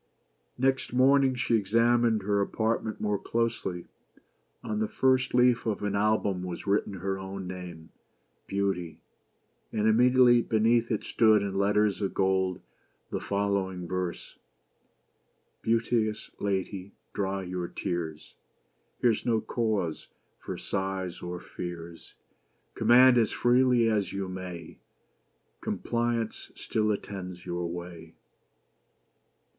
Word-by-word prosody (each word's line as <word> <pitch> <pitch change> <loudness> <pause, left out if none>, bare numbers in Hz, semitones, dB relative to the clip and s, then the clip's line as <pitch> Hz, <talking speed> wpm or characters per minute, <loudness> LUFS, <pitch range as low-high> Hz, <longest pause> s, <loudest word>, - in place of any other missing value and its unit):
Next 130 -1 0
morning 135 +1 +4
she 120 -1 +1
examined 115 +1 +2
her 100 0 +1
apartment 110 +1 -1
more 105 -2 0
closely. 115 -6 -2 0.8
On 105 0 -2
the 110 - 0
first 130 +1 +2
leaf 125 -2 +4
of 105 -2 -2
an 105 -1 -1
album 100 -2 +1
was 90 -1 -6
written 100 0 +1
her 95 +1 -3
own 95 0 -6
name: 90 -3 -8 0.3
— - - -44
''Beauty;" 95 -5 -1 0.7
and 110 -1 0
immediately 120 +1 +5
beneath 115 +1 +2
it 110 - -1
stood, 110 -3 +4
in 100 -1 -3
letters 105 +1 +2
of 100 - -2
gold, 95 -1 +1 0.5
the - - -2
following 100 -3 -1
verse: 90 0 -4 0.4
— - - -44
" - - -45
Beauteous 115 -1 0
lady 100 -1 -3
— - - -46
,dry 95 -1 -2
your 90 -1 -4
tears, 80 -4 -4 0.7
Here's 115 -3 +2
no 115 -2 +2
cause 110 -7 -2 0.3
for - - -6
sighs 95 -2 -3
or 90 0 -5
fears: 85 -1 -8 0.6
Command 125 +1 +6
as 110 - +2
freely 125 -1 +3
as 105 -4 0
you 100 -1 -3
may, 90 -3 -7 0.8
Compliance 115 -1 -2
still 110 -1 -1
attends 90 -3 -6
your 85 0 -3
way. 85 -1 -8
100 Hz, 120 wpm, -28 LUFS, 90-115 Hz, 0.8 s, Command